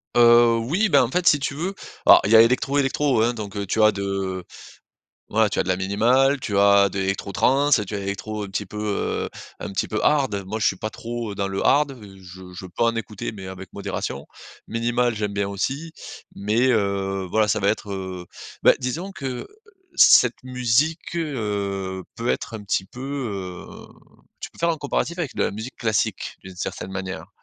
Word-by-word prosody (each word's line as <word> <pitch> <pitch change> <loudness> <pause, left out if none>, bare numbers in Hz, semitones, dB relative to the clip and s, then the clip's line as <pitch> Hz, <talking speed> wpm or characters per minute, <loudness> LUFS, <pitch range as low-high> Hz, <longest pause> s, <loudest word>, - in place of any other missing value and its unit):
Heu, 120 -1 +6
oui, 175 - +1
bah, 140 -4 +5
en 120 - -1
fait, 180 +3 0
si 145 - +6
tu 140 0 -3
veux, 180 +6 -3 0.3
alors - - +9
il 105 - 0
y - - +7
a 110 - +10
électro, 130 +4 +2
électro, 135 -3 +2
hein. 120 +1 +2
Donc, 105 -2 -7
heu, 100 0 -2
tu 110 +3 0
as 110 - +6
de 95 -2 -3 0.9
voilà, 110 0 +3
tu - - -3
as - - +4
de - - -8
la 90 - +2
minimale, 120 +8 +2
tu 100 - -3
as 100 0 +6
de 95 - -6
l'électro 95 +1 -2
trance, 135 +2 +3
tu 105 - -6
as 100 - -1
l'électro 100 +2 -4
un - - -5
petit 100 +2 -3
peu, 105 +3 -8
heu, 105 -1 -2 0.3
un 100 - -5
petit 95 - -1
peu 110 - -2
hard. 135 -10 +2
Moi, 110 +3 -3
je - - +1
suis 95 - +2
pas 110 - -4
trop 115 -3 -5
dans 100 0 -2
le 95 - -3
hard. 140 -1 +3
Je 95 -2 -12
je 90 +1 -8
peux 90 +5 -4
en 115 0 +2
écouter 105 -1 -4
mais 95 -3 -9
avec 95 -1 -9
modération. 70 +1 -4 0.4
Minimale, 120 +1 0
j'aime 105 -1 -2
bien 100 -1 -1
aussi, 140 +11 -3 0.4
mais, 110 +6 +1
heu, 100 -3 -1
voilà, 110 -1 +3
ça 110 0 +1
va 100 - +2
être, 105 -1 -1
heu, 95 -2 -6 0.4
bah, - - +7
disons 165 +10 -3
que 135 -8 -5 0.5
cette 125 0 +6
musique, 130 +7 0
heu, 100 - -3
peut 115 +1 -3
être 115 - -3
un 105 -2 -7
petit 95 -1 0
peu, 125 +6 -13
heu, 105 -10 -6 0.5
tu - - -6
peux - - -22
faire 170 0 +2
un 160 - -2
comparatif 160 +4 -2
avec 160 -7 -3
de - - +2
la - - 0
musique 110 +5 -7
classique, 110 -4 -1
d'une 95 -1 -11
certaine 95 +1 -5
manière. 95 0 -5
110 Hz, 205 wpm, -23 LUFS, 100-130 Hz, 0.9 s, a